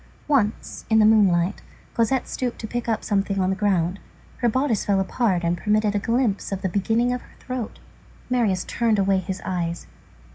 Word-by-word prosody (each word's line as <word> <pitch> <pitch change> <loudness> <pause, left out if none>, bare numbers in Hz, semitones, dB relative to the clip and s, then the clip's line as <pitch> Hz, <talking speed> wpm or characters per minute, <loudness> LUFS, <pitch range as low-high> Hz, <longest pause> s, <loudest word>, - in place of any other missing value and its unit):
Once, 245 -8 0
in 220 - +4
the 215 - +6
moonlight, 195 -4 +3 0.3
Cosette 240 +3 +1
stooped 250 -2 -3
to - - -6
pick 240 +2 -3
up 220 -2 0
something 195 -1 0
on 185 0 +2
the - - 0
ground, 190 -2 0 0.4
her 240 - +2
bodice 255 -2 +1
fell 200 -1 +2
apart 190 -2 0
and 170 +1 0
permitted 210 +1 +1
a 205 - +1
glimpse 230 -2 0
of 195 -1 -4
the 190 - +1
beginning 225 +6 +1
of 250 - -3
her - - -19
throat. 250 -4 -5 0.5
Marius 225 -7 +1
turned 230 -3 +1
away 195 -1 +2
his 185 +1 -5
eyes. 175 -2 -2
210 Hz, 185 wpm, -23 LUFS, 190-235 Hz, 0.5 s, the